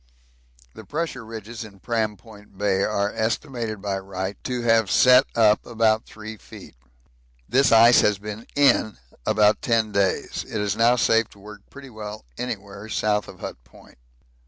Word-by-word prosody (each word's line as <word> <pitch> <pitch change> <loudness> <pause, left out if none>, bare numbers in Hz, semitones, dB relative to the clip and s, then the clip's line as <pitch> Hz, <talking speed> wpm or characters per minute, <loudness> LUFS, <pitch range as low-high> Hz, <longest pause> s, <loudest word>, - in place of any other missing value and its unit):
The - - -11
pressure 155 -6 -4
ridges 115 +1 -8
in 100 -3 -13
Pram 110 -1 -2
Point 105 -1 -17
Bay 100 -1 +1
are 100 0 0
estimated 110 -2 -3
by 100 -1 -2
Wright 95 0 -5
to 125 -2 -2
have 115 -3 +3
set 125 +1 +6
up 110 -2 +4
about 110 -1 +1
3 110 0 -9
feet. - - -13 0.7
This 135 +2 +3
ice 115 +1 +7
has 105 -1 +2
been 105 +3 -8
'in' 140 -6 +3 0.3
about 105 0 +3
ten 115 -2 +1
days. 100 -2 -1
It 110 - -5
is 105 -1 -1
now 115 +2 +4
safe 115 -2 +2
to 100 - -19
work 105 +1 -12
pretty 140 -2 -12
well 105 - -8
anywhere 105 -3 -6
south 105 -2 0
of - - -13
Hut - - -7
Point. - - -20
110 Hz, 160 wpm, -23 LUFS, 105-115 Hz, 0.7 s, ice